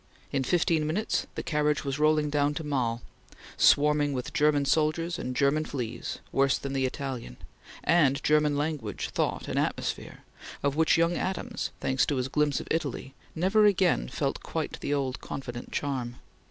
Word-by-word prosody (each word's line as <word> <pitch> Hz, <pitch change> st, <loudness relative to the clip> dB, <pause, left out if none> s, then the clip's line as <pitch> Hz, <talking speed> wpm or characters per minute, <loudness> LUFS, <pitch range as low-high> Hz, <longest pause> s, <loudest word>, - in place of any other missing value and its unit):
In 135 Hz, -1 st, 0 dB
fifteen 160 Hz, +1 st, +2 dB
minutes 195 Hz, +8 st, -1 dB
the -, -, -4 dB
carriage 150 Hz, -1 st, +1 dB
was 140 Hz, +1 st, -2 dB
rolling 155 Hz, -1 st, +3 dB
down 145 Hz, 0 st, +1 dB
to 165 Hz, -, -3 dB
Mals, 125 Hz, -5 st, -1 dB, 0.5 s
swarming 145 Hz, 0 st, +4 dB
with 125 Hz, -2 st, -4 dB
German 145 Hz, -1 st, +3 dB
soldiers 160 Hz, +4 st, +1 dB
and 125 Hz, 0 st, -4 dB
German 140 Hz, +3 st, +2 dB
fleas, 125 Hz, -7 st, -4 dB
worse 135 Hz, 0 st, +3 dB
than 140 Hz, 0 st, -5 dB
the 135 Hz, -1 st, +1 dB
Italian; 130 Hz, -, -5 dB, 0.5 s
and 145 Hz, -5 st, +3 dB
German 150 Hz, -1 st, +3 dB
language, 145 Hz, -9 st, -3 dB
thought, -, -, -1 dB
and -, -, -1 dB
atmosphere, -, -, -3 dB, 0.4 s
of 140 Hz, 0 st, +1 dB
which 160 Hz, +1 st, +4 dB
young 165 Hz, +1 st, +3 dB
Adams, 190 Hz, +1 st, -3 dB
thanks 130 Hz, 0 st, +1 dB
to 145 Hz, -, 0 dB
his 130 Hz, 0 st, -1 dB
glimpse 150 Hz, 0 st, +1 dB
of -, -, -8 dB
Italy, 140 Hz, -4 st, -2 dB, 0.2 s
never 195 Hz, +6 st, +3 dB
again 185 Hz, -, +2 dB
felt -, -, -2 dB
quite -, -, -4 dB
the -, -, -3 dB
old 135 Hz, -3 st, -1 dB
confident 120 Hz, -3 st, -6 dB
charm. 130 Hz, -4 st, -2 dB
145 Hz, 165 wpm, -28 LUFS, 135-155 Hz, 0.5 s, swarming